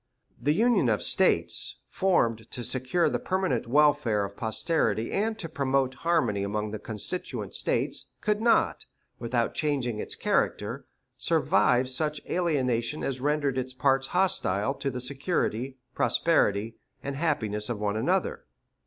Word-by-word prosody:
The 145 +5 +2
union 235 +5 +3
of - - +1
States, - - +2
formed 115 - +1
to 125 - -4
secure 130 +8 +1
the - - 0
permanent 185 -12 -1
welfare 140 -6 +3
of 100 0 -9
posterity 110 - 0
and 220 +2 0
to 175 - -5
promote 135 -3 0
harmony 130 -12 +1
among 105 +1 -2
the 110 - -5
constituent 110 - -5
States, - - 0
could 210 0 0
not, 230 0 +2 0.3
without 120 0 -1
changing 135 -7 -1
its - - -4
character, - - -1 0.3
survive 125 +1 +3
such 150 +3 0
alienation 140 -7 0
as 130 -2 -2
rendered 145 -2 +1
its 130 0 -5
parts 135 +1 +2
hostile 135 - +1
to 140 - -3
the 125 -1 -4
security, 135 - -1 0.2
prosperity, 110 -9 +1 0.3
and 140 0 -4
happiness 115 -9 -1
of 115 -4 -3
one 105 -1 -1
another. 110 - 0
130 Hz, 135 wpm, -27 LUFS, 115-155 Hz, 0.3 s, union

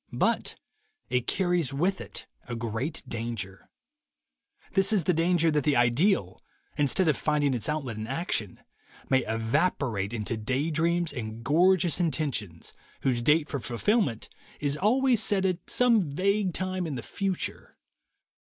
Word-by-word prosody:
But - - +1 0.6
it 125 -1 0
carries 175 -7 0
with 185 +7 0
it - - -7 0.2
a 120 - -4
great 115 +7 -3
danger. 110 -5 -5 1.0
This 195 +1 +3
is 205 -5 +3
the 180 - +2
danger 165 0 +2
that 150 -2 +1
the 145 0 +2
ideal, 120 - +2 0.3
instead 150 +5 +1
of 155 - +4
finding 145 -3 +1
its 115 0 -2
outlet 135 -7 -3
in 110 0 -5
action, 130 - -2 0.5
may 130 - +5
evaporate 115 - 0
into 115 0 -2
day 130 +8 -1
dreams 170 +1 +1
and 115 -3 -6
gorgeous 175 +5 +3
intentions 140 - -2 0.3
whose 125 -3 +1
date 150 +5 +3
for 140 - -3
fulfillment 125 - 0 0.3
is 145 -1 0
always 240 - +3
set 195 -3 +2
at 180 -2 -2
some 230 -9 +3
vague 195 +5 +1
time 185 -1 -2
in 150 - -4
the 120 - -5
future. 195 -3 -3
150 Hz, 145 wpm, -27 LUFS, 120-180 Hz, 1.0 s, may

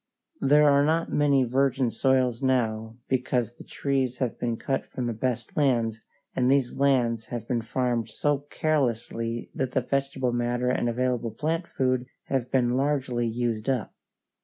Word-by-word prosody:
There 150 +2 +5
are 140 0 +5
not 160 +3 +1
many 140 -2 +4
virgin 130 0 +1
soils 130 0 +2
now 115 -4 0
because 125 -2 0
the - - -13
trees 135 -3 -1
have 125 -3 -2
been 120 -2 -1
cut 135 +2 -1
from 125 - -4
the 120 - -1
best 120 +2 -3
lands, 115 -6 +1 0.3
and 125 -1 +2
these 135 -2 +2
lands 120 -5 +1
have 120 -2 -5
been 120 -2 0
farmed 120 -1 -1
so 145 +6 0
carelessly 120 -6 -1
that 130 -1 -2
the 130 - +2
vegetable 135 -1 -1
matter 120 +1 0
and 120 - 0
available 125 -1 0
plant 160 - -2
food 130 -1 0 0.2
have 130 -3 0
been 125 -2 +2
largely 130 -3 0
used 115 0 -2
up. 125 -6 -1
125 Hz, 160 wpm, -26 LUFS, 120-135 Hz, 0.3 s, There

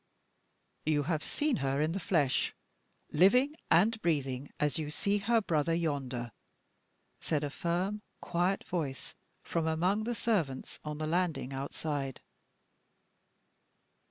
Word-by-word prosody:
"You 150 -1 +2
have 155 0 -1
seen 295 -2 0
her 135 0 0
in 155 +2 +2
the 195 - -2
flesh, 155 -7 +1 0.6
living 250 - +5 0.2
and 215 +7 +4
breathing 140 -4 0
as 150 +2 +1
you 150 -2 -3
see 200 +6 0
her 230 +3 +3
brother 165 -3 +1
yonder," 135 -7 -2 0.9
said 150 -2 0
a 145 - -2
firm, 180 +7 -1 0.2
quiet 175 +3 0
voice, 150 -7 -3 0.3
from 165 -1 -1
among 180 +7 +1
the 240 0 -1
servants 165 - -1
on 150 -1 -4
the 155 - -2
landing 165 -5 0
outside. 140 0 -3
160 Hz, 125 wpm, -32 LUFS, 145-190 Hz, 0.9 s, living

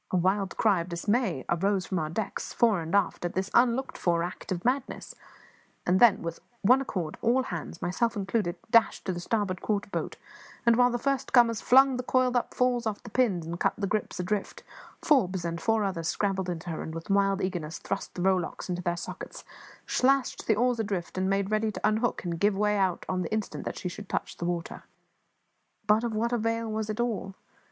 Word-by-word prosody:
A 185 - +1
wild 190 +2 0
cry 200 -6 +3
of 170 - -7
dismay 185 - 0
arose 190 +2 +1
from 185 - -2
our 155 -1 -2
decks, 195 +6 -4
fore 220 -7 +3
and 165 +3 -2
aft, 200 -3 +1
at 175 - -3
this 190 +1 -2
unlooked 250 +2 +2
for 170 -1 +1
act 175 +2 -6
of 175 +1 -3
madness; 255 +2 -1 0.7
and 180 +2 +3
then, 220 -6 +6
with 165 0 -4 0.2
one 250 +6 +6
accord, 180 -11 -4
all 245 +3 +3
hands, 170 -5 -6
myself 230 +7 0
included, 195 -2 -1 0.2
dashed 230 -2 +4
to 185 - -1
the 175 - -5
starboard 190 -1 -1
quarter 205 -2 -2
boat 165 -2 -3 0.5
and, 235 -1 +6
while 245 +1 +5
the 240 - -1
first 275 +1 -1
comers 235 -4 +5
flung 265 0 +5
the 250 - -3
coiled 255 0 +2
up 245 - 0
falls 245 -2 +1
off 210 -2 -4
the 235 - -10
pins 200 -10 +1
and 170 +1 -5
cut - - +1
the 205 - -1
gripes 205 -1 -2
adrift, 195 +3 -3 0.4
Forbes 190 - +2
and 170 0 -3
four 225 -1 +2
others 175 -5 -2
scrambled 190 -1 -1
into 175 0 -4
her 160 - -4
and, 160 - -6
with 165 +4 -5
wild 195 0 +3
eagerness, 175 -5 -3
thrust 195 - -5
the 175 - -3
rowlocks 185 -1 0
into 180 0 -2
their 175 -1 -1
sockets, - - -7 0.4
slashed 270 0 +1
the 220 - +4
oars 245 +2 +1
adrift, 200 -5 -3
and 185 +1 0
made 195 +1 0
ready 215 0 +1
to - - -1
unhook 220 +3 0
and 170 -2 -3
give 200 +1 +2
way 210 0 +2 0.3
on 185 0 -1
the - - -4
instant 215 -1 -3
that - - -4
she - - -4
should 200 +3 -8
touch - - -3
the 175 - -4
water. 175 -1 -3 1.0
But 210 +2 +3
of 230 -2 -2
what 235 +3 0
avail 230 -1 -1
was 215 0 -2
it 215 +2 -3
all? 220 -5 -2
200 Hz, 210 wpm, -28 LUFS, 180-230 Hz, 1.0 s, then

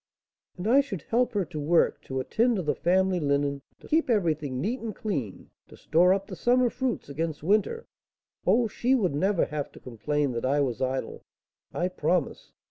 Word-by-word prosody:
"And 180 +3 -4
I 265 +5 +6
should 200 - -6
help 245 +2 +1
her 200 -3 0
to 155 - -7
work, 165 +4 +2
to 130 0 -3
attend 230 - +1
to 190 - -2
the 150 - +1
family 185 +2 +2
linen, 140 -1 0 0.2
to - - -13
keep 320 -2 +1
everything 155 - 0
neat 230 - -1
and 225 -3 -5
clean, 140 - -4 0.2
to - - -15
store 175 +4 +3
up 195 0 +1
the - - -8
summer 245 0 +2
fruits 255 -2 -2
against 155 +1 -4
winter 215 - +1 0.6
oh, 235 -1 +4
she 245 +4 +1
would 190 - +1
never 190 +5 +1
have 150 -2 -4
to - - -13
complain 140 +4 -2
that 120 -1 -4
I 135 +3 +2
was 130 -3 -1
idle, 130 0 -3 0.5
I 175 - -1
promise! 175 -2 -1
175 Hz, 190 wpm, -27 LUFS, 145-220 Hz, 0.6 s, I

